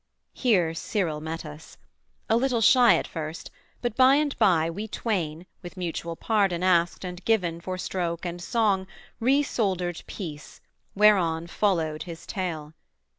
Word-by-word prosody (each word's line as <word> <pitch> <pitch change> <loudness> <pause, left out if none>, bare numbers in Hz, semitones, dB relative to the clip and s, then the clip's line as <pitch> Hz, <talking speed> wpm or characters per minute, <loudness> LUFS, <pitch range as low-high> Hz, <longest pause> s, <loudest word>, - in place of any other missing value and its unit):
Here 185 -10 +2
Cyril 165 -3 -2
met 160 +1 -5
us. 150 +1 -11 0.5
A 225 - +3
little 245 0 +1
shy 245 +2 +6
at - - -1
first, 160 0 -6 0.3
but 240 -3 -1
by 260 +2 +6
and 295 -1 +1
by 165 -4 +4
We 200 +6 -5
twain, 180 -7 -3 0.2
with 180 +1 -10
mutual 170 -1 -4
pardon 195 -4 +1
asked 175 0 +2
and 180 0 -7
given 175 -7 0
For 185 +1 -4
stroke 175 -2 -3
and 175 0 -5
song, 200 -3 +1 0.3
resoldered 210 - 0
peace, 155 -7 -8 0.4
whereon 185 -6 +4
Followed 165 -5 0
his 170 -2 -8
tale. 165 -6 -4
180 Hz, 140 wpm, -26 LUFS, 165-215 Hz, 0.5 s, shy